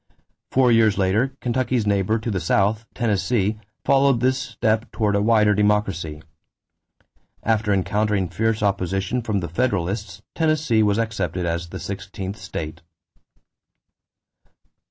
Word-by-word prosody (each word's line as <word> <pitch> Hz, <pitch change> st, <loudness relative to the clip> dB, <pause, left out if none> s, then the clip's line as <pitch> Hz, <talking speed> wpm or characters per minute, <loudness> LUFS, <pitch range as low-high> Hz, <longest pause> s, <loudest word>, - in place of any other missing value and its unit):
Four 130 Hz, -2 st, +3 dB
years 110 Hz, -3 st, +4 dB
later, 110 Hz, +8 st, +1 dB
Kentucky's 125 Hz, -1 st, 0 dB
neighbor 100 Hz, +1 st, +1 dB
to 115 Hz, +1 st, -3 dB
the 95 Hz, -, -1 dB
south, 105 Hz, +6 st, +1 dB
Tennessee, 110 Hz, -1 st, 0 dB, 0.3 s
followed 135 Hz, -2 st, +4 dB
this 130 Hz, +2 st, +2 dB
step 110 Hz, -4 st, -1 dB
toward 105 Hz, -3 st, 0 dB
a 100 Hz, -, +2 dB
wider 105 Hz, -1 st, +4 dB
democracy. 100 Hz, -7 st, 0 dB, 1.2 s
After 110 Hz, -1 st, +1 dB
encountering 100 Hz, 0 st, +1 dB
fierce 110 Hz, +5 st, -1 dB
opposition 95 Hz, +3 st, 0 dB
from 105 Hz, -4 st, -1 dB
the 85 Hz, -, -3 dB
Federalists, 95 Hz, -1 st, -2 dB
Tennessee 155 Hz, -8 st, +2 dB
was 105 Hz, -1 st, +2 dB
accepted 95 Hz, -6 st, -2 dB
as 85 Hz, 0 st, -2 dB
the 95 Hz, -, -7 dB
sixteenth 100 Hz, 0 st, -6 dB
state. 80 Hz, -6 st, -6 dB
105 Hz, 120 wpm, -22 LUFS, 95-115 Hz, 1.2 s, years